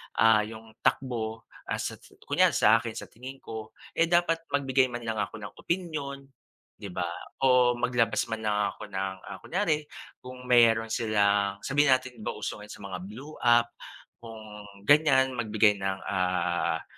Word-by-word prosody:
ah, 115 -1 +5
yung 110 0 -11 0.2
takbo, 115 -4 -1 0.2
ah, - - -1
sa - - -4
sa - - -20
kunwari - - +3
sa 110 +2 +5
akin 115 0 -6
sa - - -8
tingin 130 +3 -10
ko, 110 -1 -8 0.2
eh, 170 - +2
dapat 170 -1 +2 0.2
magbigay 135 -2 +2
man 120 -1 -6
lang 110 -1 -3
ako 105 - -3
ng 105 -2 -8
opinyon, 155 -6 -3 0.5
di 100 - -8
ba? 90 -1 -2 0.4
O 125 -1 +5
maglabas 120 -2 +1
man 110 -1 -4
lang 105 -1 +1
ako 105 - -11
ng, 95 0 -2
ah, - - -8
kunyari 160 -5 -1 0.3
kung 125 0 -10
meron 115 -2 +4
silang 100 -3 +2
sabihin 145 +1 +2
natin 130 -2 -7
di 105 - -10
ba, - - -3
uso - - -5
ngayon 105 - -11
sa - - -12
mga 95 -2 -6
blue 130 +9 -10
app, 120 0 +4 0.5
kung 115 -2 -10 0.4
ganyan, 135 0 +4
magbigay 105 -3 +2
ng, 95 0 -2
ah, 90 -3 0
115 Hz, 170 wpm, -28 LUFS, 105-130 Hz, 0.5 s, ah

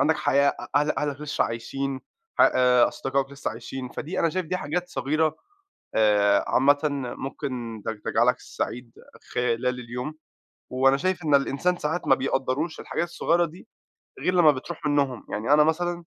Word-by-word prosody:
عندك 160 +1 +3
حياة، 140 +1 +3
أ - - -4
أه 150 +1 +3
أهلك 145 -1 -2
لسه 150 -1 0
عايشين، 135 +4 -4 0.4
ح - - +3 0.5
أصدقائك 135 0 -2
لسه 140 +1 -4
عايشين، 125 +3 -7
فدي 150 +7 -5
أنا 165 - +3
شايف 185 0 -2
دي 185 - -1
حاجات 180 +2 -3
صغيرة 155 -2 0 0.6
آآ، 105 -2 +4
عامةً 145 +2 +4
م 140 -4 -2
ممكن 125 -6 -5
تج 110 -1 -3
تجعلك - - +2
سعيد 120 0 -5 0.4
خلال 125 0 +1
اليوم، 125 +5 -5 0.6
وأنا 135 +1 +4
شايف 180 +3 -1
إن 150 -2 +2
الإنسان 140 +6 +2
ساعات 160 +1 -2
ما - - +7
بيقدّروش 135 +4 -1
الحاجات 175 - -2
الصغيّرة 170 0 +1
دي 170 +6 -10 0.5
غير 180 - 0
لمّا 170 -4 +6
بتروح 150 +4 -7
منهم، 140 -4 0
يعني 110 +7 +1
أنا 150 0 +7
مثلًا 175 +2 0
140 Hz, 160 wpm, -25 LUFS, 125-160 Hz, 0.6 s, ما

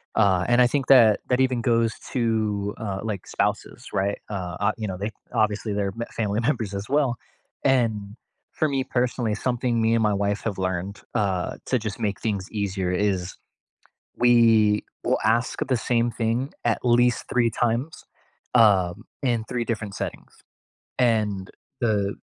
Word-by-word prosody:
Uh, 95 -4 +3
and 120 0 +4
I - - +7
think 135 +1 -1
that, 115 -6 +7
that 125 0 +2
even 130 -2 +2
goes 115 -1 +2 0.2
to, 110 -4 0
uh, 100 -3 -4
like, 105 -4 -4
spouses, - - -2
right? 100 +1 0
Uh, 90 -4 -4
ah, 100 - +2
you 110 -2 -3
know, 95 -2 -4
they 105 +3 -3 0.2
obviously, 105 0 0
they're 100 -1 -1
m - - -2
family 105 -1 -1
members 115 -5 -1
as 100 +3 -5
well, 135 -4 +2 0.5
and 110 -6 +1 0.4
for 155 - 0
me 135 -2 0
personally, 120 -3 -1
something 120 +1 -1
me 110 0 +3
and 115 - +2
my 105 -1 +2
wife 100 +1 -1
have 105 -4 -3
learned, 95 +1 -3
uh, 95 -3 -1
to 130 - +2
just 110 -1 -5
make 105 -4 -2
things 100 -4 -2
easier 100 -3 -2
is 95 -1 -1 0.8
we 115 -3 +4 0.2
will - - +2
ask 115 +2 +1
the 130 - +2
same 120 0 +3
thing 115 +4 -1
at 115 -2 +2
least 120 0 +3
3 120 -2 +2
times, 120 +6 -2 0.5
um, 100 -5 +4 0.2
in 120 -4 +1
3 120 -2 -2
different 110 -3 -3
settings. - - -6 0.7
And 105 -6 +1 0.3
the 105 -4 0
110 Hz, 160 wpm, -24 LUFS, 100-120 Hz, 0.8 s, I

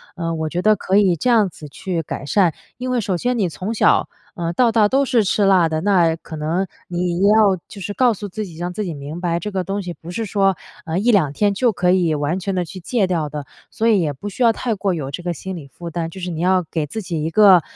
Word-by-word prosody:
呃， 165 -2 -2
我 160 -1 -2
觉 180 +2 -2
得 215 0 +5
可 195 0 0
以 195 -3 +5
这 250 - +1
样 215 -5 +4
子 150 -3 -11
去 170 +4 -3
改 140 - -6
善， 175 +1 +3 0.2
因 255 +1 -4
为 250 -1 +1
首 190 -4 -1
先 245 +5 -1
你 190 -5 +1
从 190 +7 -4
小， - - +3 0.3
呃， 170 -1 -2
到 235 +4 +3
大 215 -2 +4
都 270 +5 +2
是 245 -5 +2
吃 205 +2 +1
辣 185 -4 +5
的， 155 0 -2
那 175 -5 +3
可 165 0 -10
能 165 +5 -1 0.2
你 175 0 -1
要 205 -3 +5
就 200 - -10
是 205 +4 -4
告 250 0 +3
诉 205 -1 -7
自 215 +3 -4
己， 165 -3 -11
让 175 +1 -3
自 210 - -3
己 170 - -4
明 145 +4 -7
白 170 -2 0
这 210 +5 -5
个 190 -2 -1
东 200 +2 -2
西 175 -1 -5
不 165 - -12
是 225 +5 -3
说， 195 -2 +2 0.3
呃， 165 +2 -2
1-2 195 - +3
天 205 +5 +2
就 235 +4 +2
可 180 -1 +2
以 175 -4 +2
完 150 +5 -1
全 190 +1 -3
地 180 - +1
去 185 +2 -9
戒 200 +2 0
掉 165 -4 -1
的， 150 -1 -6 0.2
所 225 - -1
以 210 -4 +4
也 150 -3 -1
不 200 +10 -7
需 205 - -8
要 230 -2 +5
太 230 0 -2
过 195 -2 -1
有 140 -4 -4
这 175 - -5
个 175 0 -2
心 190 +4 -6
理 140 -4 -9
负 170 +6 -9
担， 165 0 -3
就 185 +2 -10
是 180 0 -3
你 160 - -5
要 185 +1 +2
给 160 -3 -1
自 220 - -5
己 170 -5 -3
一 160 - -1
个， 190 -2 +7
185 Hz, 290 characters per minute, -20 LUFS, 165-205 Hz, 0.3 s, 个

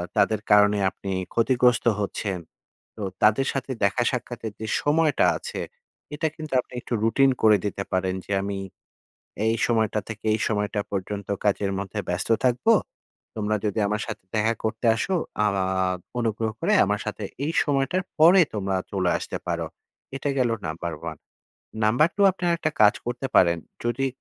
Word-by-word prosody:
তাদের 110 -2 +3
কারণে 105 0 +6
আপনি 95 +1 -7 0.2
ক্ষতিগ্রস্ত 125 +1 +3
হচ্ছেন। 100 -2 -2 0.6
তো 110 - -9 0.2
তাদের 110 +6 +4
সাথে 135 0 -3
দেখা 100 +5 +2
সাক্ষাতের 120 -3 -5
যে 110 - -5
সময়টা 155 +1 +3
আছে, - - -6 0.5
এটা 155 +2 0
কিন্তু 155 -3 -7
আপনি - - -20
একটু - - -6
রুটিন 135 +5 +4
করে 110 -1 +6
দিতে 100 -1 -2
পারেন 95 0 0
যে, - - -8
"আমি 100 0 -3 0.9
এই 115 +1 +2
সময়টা 110 -2 +1
থেকে 110 0 -8
এই - - 0
সময়টা 105 -1 -1
পর্যন্ত 100 0 -4 0.2
কাজের 100 -1 +1
মধ্যে 100 +1 -5
ব্যস্ত 90 +1 -2 0.2
থাকবো। 130 - +3 0.6
তোমরা 110 -1 0
যদি 105 0 -1
আমার 105 +1 -1
সাথে 110 -4 -7
দেখা 110 +2 +2
করতে 110 +2 -1
আসো 185 - -1 0.3
আ - - +4 0.2
আ - - +1 0.2
আ - - +1 0.3
অনুগ্রহ 110 -1 -1
করে 190 +6 +1
আমার 105 +1 0
সাথে 105 0 -4 0.2
এই 155 - -1
সময়টার 145 +5 0 0.2
পরে 175 +4 +8
তোমরা 95 -2 -1 0.2
চলে 95 -3 +1
আসতে - - -5
পারো।" - - -2 0.5
এটা 140 - -3
গেল 125 -2 +2 0.2
নাম্বার 85 +2 -4 0.2
1। - - -12 0.6
নাম্বার 120 +9 +4
2 200 - +4
আপনি 185 - -20
আরেকটা 165 -2 0
কাজ 105 +1 +7
করতে 120 +2 -2
পারেন। 85 -2 +5 0.3
যদি 120 +3 0
110 Hz, 165 wpm, -25 LUFS, 100-130 Hz, 0.9 s, পরে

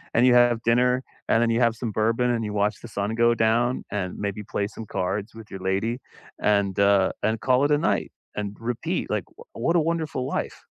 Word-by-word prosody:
and 120 - +5
you 125 - +6
have 120 -1 +4
dinner, 125 +2 +3 0.2
and 115 - +3
then 115 - +2
you 115 - +1
have 115 -2 +3
some 115 -1 -4
bourbon, 115 +4 +1
and 115 -1 -1
you 105 - -3
watch 105 0 0
the - - -9
sun 105 0 -3
go 120 0 +4
down, 115 +3 +1
and 95 -3 -3
maybe 100 0 -3
play 100 0 -2
some 110 +1 -9
cards 100 +5 -3
with 110 -1 -12
your 95 - -6
lady, 100 +6 -1 0.4
and, 100 -2 +1
uh, 100 -1 +4
and 110 +1 0
call 130 +1 +3
it 145 - +3
a 145 - +5
night, 165 - 0 0.2
and 105 -1 -4
repeat. 120 0 -2
Like, - - -1
w - - -29 0.2
what 165 +9 0
a - - +5
wonderful 160 -5 -1
life. - - -4
115 Hz, 225 wpm, -25 LUFS, 105-120 Hz, 0.4 s, you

